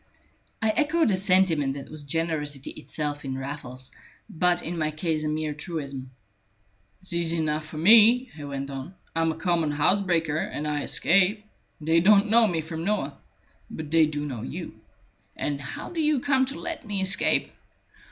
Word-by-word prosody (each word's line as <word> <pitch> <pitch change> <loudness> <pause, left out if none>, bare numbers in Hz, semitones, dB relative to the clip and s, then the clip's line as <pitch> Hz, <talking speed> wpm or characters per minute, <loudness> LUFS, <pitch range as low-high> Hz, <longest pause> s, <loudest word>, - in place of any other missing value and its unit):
I 220 - +3
echoed 310 +1 +2
a - - +3
sentiment 185 -7 +2
that 140 +1 -9
was 155 -1 -8
generosity 150 -2 -2
itself 150 -1 -4
in 135 -1 -4
Raffles, 130 -2 -6 0.4
but 175 +1 +1
in 175 - -4
my 155 -1 +1
case 155 0 -2
a - - -1
mere 155 0 -2
truism. 145 -5 -6 0.9
"It's 185 - -7
easy 170 -1 +1
enough 155 -1 -1
for 155 - -9
me," 230 +8 +6
he 150 - -9
went 140 -1 -5
on. 135 +7 -7 0.2
"I 165 - +1
am 165 0 +2
a - - -5
common 165 -2 0
house 150 +7 +3
breaker, 165 -5 0
and 150 -1 -3
I 150 -1 -1
escape. 195 +7 +2 0.3
They 160 +2 +3
don't 205 +3 +5
know 230 0 +6
me 165 -4 -1
from 160 +1 -6
Noah. 210 +3 -2 0.5
But 155 -1 -7
they 165 -1 +5
do 150 -1 -4
know 130 -6 -5
you; 65 - -6 0.6
and 145 -1 -3
how 140 - -7
do 335 -2 -2
you 300 -2 +2
come 265 -1 +2
to 275 - -6
let 330 - -5
me 205 -4 -2
escape? 190 +1 +1
160 Hz, 180 wpm, -26 LUFS, 150-195 Hz, 0.9 s, me